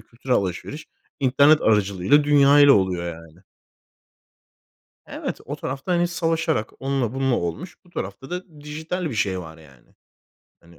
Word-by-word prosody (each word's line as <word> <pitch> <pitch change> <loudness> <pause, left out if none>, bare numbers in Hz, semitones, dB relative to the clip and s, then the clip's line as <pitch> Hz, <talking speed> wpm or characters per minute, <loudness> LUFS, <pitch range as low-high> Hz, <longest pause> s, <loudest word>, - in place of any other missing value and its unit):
kültürel 125 +2 -2
alışveriş 100 - -4 0.3
internet 140 +4 +4
aracılığıyla 105 +6 +3
dünyayla 145 -1 +6
oluyor 95 -3 +1
yani. 80 +1 -16 1.7
Evet, - - -6
o - - -5
tarafta, 135 +7 -5
hani, 175 0 +2
savaşarak 165 -8 -1
onunla 135 -3 -1
bununla 135 -2 +1
olmuş. 85 - -4
Bu - - -21
tarafta 100 - -7
da 175 -4 -8
dijital 160 +4 -4
bir 125 - -6
şey 95 -3 0
var 80 -2 -10
yani. 70 -6 -20 0.7
Hani, 85 0 -20
135 Hz, 135 wpm, -23 LUFS, 95-150 Hz, 1.7 s, dünyayla